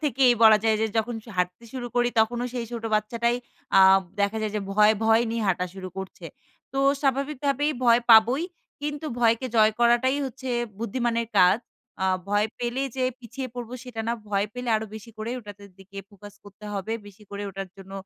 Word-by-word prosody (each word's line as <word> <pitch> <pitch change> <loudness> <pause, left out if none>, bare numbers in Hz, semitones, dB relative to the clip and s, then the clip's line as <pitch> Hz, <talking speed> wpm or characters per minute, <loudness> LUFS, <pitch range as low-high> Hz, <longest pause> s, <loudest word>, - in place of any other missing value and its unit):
থেকেই 265 -3 +4
বলা 215 -1 +8
যায় 220 -1 +3
যে 220 - +2
যখন 235 +2 -1
স - - -23
হাঁটতে 180 +4 -1
শুরু 250 -2 -5
করি 240 0 +3
তখনও 240 +2 0
সেই 240 -2 -2
ছোট 230 -1 -5
বাচ্চাটাই 235 +3 0 0.4
আ - - +8 0.4
দেখা 200 +2 +1
যায় 215 - -2
যে - - -1
ভয়, 210 +1 +5
ভয় 225 +1 +5
নিয়ে 230 -1 -2
হাঁটা 180 0 0
শুরু 185 -1 -7
করছে। 190 -1 -8 0.5
তো 270 - -3 0.2
স্বাভাবিকভাবেই 280 +2 0
ভয় 235 0 +6
পাবই। 235 +7 +7 0.4
কিন্তু 295 +1 -4
ভয়কে 230 +2 +2
জয় 215 0 +5
করাটাই 240 +3 +3
হচ্ছে 260 0 -8 0.3
বুদ্ধিমানের 235 0 -1
কাজ। 185 +4 +6 0.5
আ - - +2 0.2
ভয় 205 +1 +2
পেলে 245 +2 -2
যে 255 - +1 0.2
পিছিয়ে 255 +2 -6
পড়বো 245 0 -6
সেটা 240 -3 -6
না। - - +1 0.2
ভয় 200 0 +1
পেলে 250 -1 -5
আরো 220 0 -4
বেশি 220 +2 -10
করে 220 +2 -4
ওটাতে 205 -2 -11
দিকে 195 +1 -12
ফোকাস 205 +1 -13
করতে 205 +1 -14
হবে। 200 +3 -3
বেশি 205 +1 -15
করে 200 0 -5
ওটার 195 0 -6
জন্য 195 0 -12
230 Hz, 185 wpm, -25 LUFS, 205-245 Hz, 0.5 s, বলা